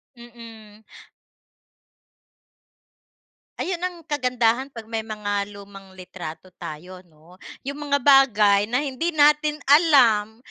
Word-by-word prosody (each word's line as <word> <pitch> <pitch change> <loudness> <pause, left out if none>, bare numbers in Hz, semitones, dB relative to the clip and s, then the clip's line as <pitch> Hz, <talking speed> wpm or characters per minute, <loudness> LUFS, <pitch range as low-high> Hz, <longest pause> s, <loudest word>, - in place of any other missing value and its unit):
Mm. 225 -3 -14 2.8
Ayun 355 -1 -3
ang 365 -1 -3
kagandahan 250 -3 0
'pag 230 -4 -11
may 225 0 -4
mga 205 -2 -4
lumang 195 -2 -14
litrato 180 -1 -10
tayo 180 +4 -9
'no, 170 +1 -22 0.2
yung 285 +2 -6
mga 285 - +3
bagay 215 -7 +4
na 255 +5 -1
hindi 280 +6 -3
natin 300 -1 +2
alam 250 -8 +4
225 Hz, 105 wpm, -22 LUFS, 200-280 Hz, 2.8 s, bagay